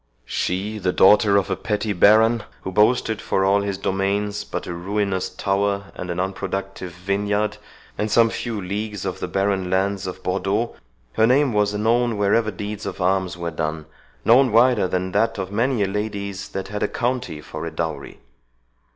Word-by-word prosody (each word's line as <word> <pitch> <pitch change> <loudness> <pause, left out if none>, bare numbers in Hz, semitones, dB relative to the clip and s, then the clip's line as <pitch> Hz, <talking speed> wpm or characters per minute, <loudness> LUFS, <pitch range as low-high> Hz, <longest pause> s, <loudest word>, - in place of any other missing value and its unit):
She, 100 +4 -2
the 90 -2 0
daughter 100 +2 +5
of 100 - 0
a - - +1
petty 105 0 -2
baron, 110 +5 +5 0.2
who 95 - -4
boasted 110 +2 +2
for 95 - 0
all 100 +1 +3
his 100 -1 -2
domains 100 +2 -1
but - - -5
a - - -5
ruinous 95 +1 -1
tower, 100 0 -1
and 90 - -7
an 85 0 -3
unproductive 95 0 -4
vineyard, 100 +3 -1 0.4
and 105 - 0
some 115 +1 +4
few 115 -3 -3
leagues 100 +1 -4
of 95 - -3
the - - -3
barren 95 -1 0
Landes 95 +1 0
of 90 - -7
Bourdeaux, 100 +5 -1 0.4
her 110 - +4
name 135 0 +3
was 105 0 +1
known 115 +2 +1
wherever 105 +2 +2
deeds 105 +1 -5
of 100 - -6
arms 95 -1 0
were 85 -1 -3
done, 80 -1 -3 0.4
known 125 +2 +6
wider 115 -3 +4
than 90 0 -2
that 115 +3 +1
of 95 -1 -4
many 115 +1 +1
a - - +1
lady's 100 -1 -4
that 95 0 -5
had 105 0 -4
a - - +2
county 120 -10 -2
for 80 +2 -6
a - - -5
dowery. 80 0 -5
100 Hz, 175 wpm, -22 LUFS, 95-105 Hz, 0.4 s, known